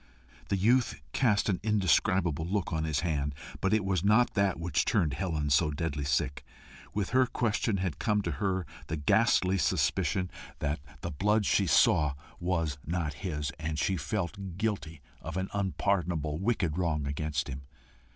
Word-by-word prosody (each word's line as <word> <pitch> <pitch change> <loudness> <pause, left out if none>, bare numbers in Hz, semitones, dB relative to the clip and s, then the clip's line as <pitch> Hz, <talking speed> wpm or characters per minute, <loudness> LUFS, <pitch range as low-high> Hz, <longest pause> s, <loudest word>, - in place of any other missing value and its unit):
The 100 - +1
youth 120 +6 +2
cast 105 -6 +2
an 95 -4 +1
indescribable 95 -5 +2
look 100 -2 -1
on 80 -1 0
his 80 0 0
hand, 75 -4 -1 0.2
but 95 - +1
it 110 -3 +2
was 95 -3 0
not 110 +4 +4
that 100 -4 +1
which 85 -2 +1
turned 85 - +1
Helen 80 -3 -2
so 75 +3 +4
deadly 75 -1 -2
sick: 70 0 0 0.5
with 100 -3 -1
her 130 0 +4
question 115 -3 0
had 90 -5 -2
come 105 -2 +1
to - - -1
her 95 -3 0 0.2
the 80 - -2
ghastly 90 +5 +3
suspicion 90 +1 +1 0.3
that 75 0 -1 0.2
the - - -4
blood 105 +8 +2
she 100 0 +2
saw 75 -3 +4 0.2
was 80 -5 -1
not 80 -2 -2
his, 75 -6 -2
and 80 -1 -3
she 95 - +1
felt 95 +2 -4
guilty 95 -8 -2 0.2
of - - -5
an 95 +1 -2
unpardonable, 90 -5 0
wicked 95 -6 0
wrong 80 -5 0
against 70 0 -2
him. 70 0 -6
90 Hz, 160 wpm, -30 LUFS, 75-100 Hz, 0.5 s, not